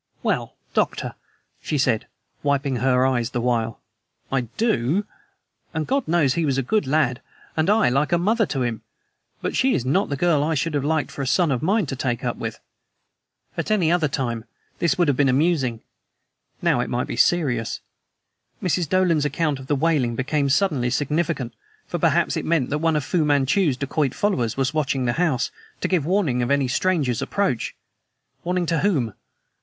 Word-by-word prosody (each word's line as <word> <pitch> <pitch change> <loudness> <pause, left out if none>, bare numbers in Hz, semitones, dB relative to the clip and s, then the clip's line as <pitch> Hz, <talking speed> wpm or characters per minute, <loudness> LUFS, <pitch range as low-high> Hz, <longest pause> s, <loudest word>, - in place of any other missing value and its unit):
"Well, - - -1 0.2
Doctor," - - 0 0.5
she 150 - -2
said, 125 -5 +1 0.3
wiping 140 -2 0
her 125 +1 +3
eyes 120 -3 +1
the 120 - -2
while, 115 -2 0 0.5
"I 135 -1 +2 0.2
DO. 195 - +1 0.7
And 160 -1 -1
God 275 -1 0
knows 155 -5 +3
he 170 - 0
was 140 -3 +1
a 135 - +1
good 210 - 0
lad, 135 -3 +1 0.3
and 160 +3 +1
I 215 - +4
like 140 +4 +1
a 175 - +4
mother 215 +4 +2
to 135 -4 -1
him; 115 -2 -2 0.6
but - - -2
she 260 0 +3
is 120 - -1
not 170 +10 +1
the 140 - -2
girl 160 -2 +2
I 160 +1 0
should 160 +3 -1
have 145 -2 0
liked 155 +1 -1
a 135 - -1
son 165 +3 +3
of 125 - 0
mine 200 +4 +2
to 135 - -4
take 125 -3 -2
up - - -1
with." - - -5 1.0
At - - -3
any 185 -7 +3
other 170 -3 +2
time, 120 -5 -3 0.3
this 170 +3 +1
would 175 -2 +3
have 145 - +3
been 140 0 +3
amusing; 135 -4 +1 0.8
now, - - +3
it - - -1
might - - -1
be - - -5
serious. 130 -10 +1 0.8
Mrs. 175 -3 0
Dolan's 180 -5 +3
account 150 -1 0
of 130 - -10
the 145 - +1
wailing 140 -5 +1
became 140 +3 0
suddenly 140 -6 +2
significant, 145 -2 -1 0.3
for - - -4
perhaps - - +2
it - - -2
meant 155 -6 +1
that 150 - 0
one 165 0 +2
of 150 - 0
Fu 165 +3 +1
Manchu's 145 +1 +2
dacoit 140 0 -1
followers 125 - 0
was 135 +1 0
watching 135 -4 0
the 120 - +1
house, 155 -8 +1 0.3
to - - -1
give 175 -5 0
warning 170 -10 +1
of 120 - -1
any 140 -1 +2
stranger's 140 -4 +1
approach! 190 - -1 0.7
Warning 180 0 0
to 165 -1 0
whom? 140 - +1
145 Hz, 185 wpm, -23 LUFS, 130-170 Hz, 1.0 s, I